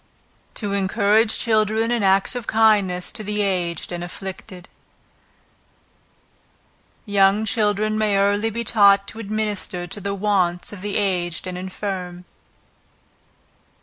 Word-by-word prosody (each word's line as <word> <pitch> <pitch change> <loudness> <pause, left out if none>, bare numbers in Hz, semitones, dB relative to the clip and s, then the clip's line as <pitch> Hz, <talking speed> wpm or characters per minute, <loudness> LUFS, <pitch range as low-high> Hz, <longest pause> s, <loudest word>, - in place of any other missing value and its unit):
To 205 -3 -3
Encourage 205 +3 +2
Children 220 0 +1
in 240 -2 +1
Acts 195 +2 +3
of 245 -2 -5
Kindness 205 -5 +2
to 215 - -6
the 210 0 -1
Aged 180 -4 -2
and 175 0 -4
Afflicted. 185 0 -8 2.4
Young 200 0 +3
children 215 0 0
may 210 -2 +2
early 205 +2 +2
be 230 +2 -4
taught 200 -3 +4
to 220 - -10
administer 210 -4 -3
to 200 +4 -8
the 200 +1 -3
wants 190 -3 0
of 195 - -9
the 205 0 -2
aged 180 -4 -1
and 185 -1 -5
infirm. 180 -1 -5
200 Hz, 120 wpm, -22 LUFS, 185-215 Hz, 2.4 s, taught